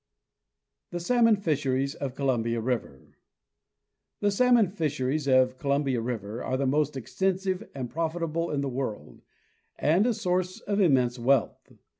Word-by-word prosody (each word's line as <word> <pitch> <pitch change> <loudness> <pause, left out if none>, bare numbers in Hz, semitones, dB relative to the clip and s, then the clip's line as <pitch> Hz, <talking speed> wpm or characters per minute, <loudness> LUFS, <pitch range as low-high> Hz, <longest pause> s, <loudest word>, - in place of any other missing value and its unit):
The 175 - -4
Salmon 230 +4 +4
Fisheries 140 -7 -1
of 135 -4 -5
Columbia 120 -4 0
River. 115 - -4 1.0
The 205 0 +2
salmon 235 -2 +4
fisheries 150 -5 -1
of 130 -1 +3
Columbia 140 -3 0
river 115 -2 -4
are 130 - -1
the 140 - 0
most 145 +1 +1
extensive 190 - -2
and 130 -3 -4
profitable 165 +2 -2
in 145 -2 -1
the 140 - -2
world, 125 - -5 0.6
and 175 +10 +3
a 240 - +1
source 185 -3 -1
of 200 0 -1
immense 130 -8 +3
wealth. 130 +1 0
140 Hz, 135 wpm, -27 LUFS, 130-180 Hz, 1.0 s, Salmon